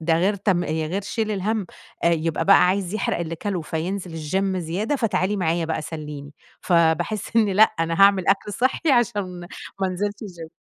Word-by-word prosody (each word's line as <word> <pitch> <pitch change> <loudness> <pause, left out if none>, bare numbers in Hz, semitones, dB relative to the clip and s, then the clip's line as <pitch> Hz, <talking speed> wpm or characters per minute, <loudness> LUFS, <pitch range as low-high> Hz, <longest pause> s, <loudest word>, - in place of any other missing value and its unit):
ده 160 0 +2
غير 195 +4 +2
تـم 185 -3 0
آآ - - -6
غير 160 +5 -2
شيل 220 +2 -2
الهم، 210 0 -1 0.4
آآ - - +5
يبقى 165 -1 0
بقى 195 -2 +6
عايز 190 +1 -1
يحرق 215 - -1
اللي 165 -1 -4
كله، 190 +1 -3
فينزل 175 +4 -4 0.2
الGym 190 +1 0
زيادة 185 - -2
فتعالي 210 -5 0
معايا 170 -2 0
بقى 160 -1 -2
سلِّيني 150 -2 -7 0.3
فباحس 170 +5 +1
إني 215 -3 +4
لأ 210 - +6
أنا 165 -3 +1
هاعمل 195 -2 +5
أكل 195 +1 +1
صحّي 260 - +1
عشان 205 -7 0 0.4
ما 190 - +2
أنزلش 195 +3 -2
الGym. 170 -5 -9
185 Hz, 180 wpm, -23 LUFS, 165-205 Hz, 0.4 s, بقى